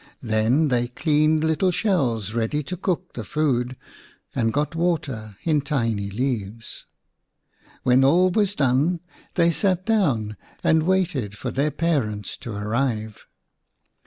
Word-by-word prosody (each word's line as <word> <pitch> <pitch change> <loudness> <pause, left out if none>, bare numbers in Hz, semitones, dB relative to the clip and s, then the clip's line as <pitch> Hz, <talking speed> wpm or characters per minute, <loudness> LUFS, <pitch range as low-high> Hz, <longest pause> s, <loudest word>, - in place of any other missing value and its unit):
Then 115 +7 +2
they 120 -1 +1
cleaned 155 +4 +2
little 160 +4 +2
shells 130 - 0
ready 120 +6 -1
to 180 +7 -4
cook 180 0 -2
the 115 - -5
food, 130 -2 0 0.6
and 115 -2 +1
got 150 +5 -1
water 140 - -2
in 155 -3 +2
tiny 115 -8 -1
leaves. 115 -1 -4 1.0
When 125 +1 +4
all 180 +7 +4
was 205 0 +1
done 145 +5 +2 0.3
they 170 -1 +4
sat 185 +1 0
down 135 - +1 0.3
and 160 0 +4
waited 165 - 0
for - - -4
their 140 +3 +1
parents 135 - -1
to 125 -3 -7
arrive. 110 +1 -2
135 Hz, 130 wpm, -23 LUFS, 115-165 Hz, 1.0 s, When